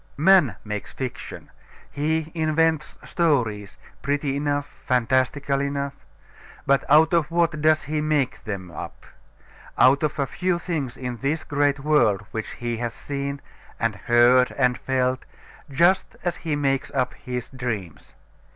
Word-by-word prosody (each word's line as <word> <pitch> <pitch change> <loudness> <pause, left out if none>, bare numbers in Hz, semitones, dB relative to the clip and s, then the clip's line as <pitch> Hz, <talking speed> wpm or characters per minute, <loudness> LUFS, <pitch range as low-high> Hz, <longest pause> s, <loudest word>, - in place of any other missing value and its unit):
Man 155 - +5
makes 105 -1 -5
fiction: 125 -1 -7 0.4
he 160 +2 -1
invents 160 -1 +1
stories, 120 - 0 0.2
pretty 140 0 -1
enough, 145 0 -1 0.2
fantastical 130 +3 +1
enough. 140 0 -2 0.7
But 140 0 +3
out 155 +3 +6
of 165 -3 +2
what 170 -2 +1
does 155 0 +3
he 150 +1 -2
make 150 -4 0
them 95 -5 -6
up? 85 - -8 0.7
Out 135 +2 +5
of 155 - -1
a 140 - +1
few 180 +6 -1
things 150 -8 -4
in 125 -2 -5
this 145 +6 -1
great 145 -1 0
world 135 -9 +3
which 110 -1 -4
he 120 -1 -3
has 120 0 -3
seen, 140 0 -4 0.4
and 115 -1 +1
heard, 120 +3 +4
and 125 -2 +3
felt, 130 0 -1 0.5
just 170 +7 +2
as 175 - -1
he 160 -3 -2
makes 135 -2 0
up 130 -1 0
his 125 -3 -6
dreams. 115 - -6
140 Hz, 140 wpm, -24 LUFS, 125-155 Hz, 0.7 s, out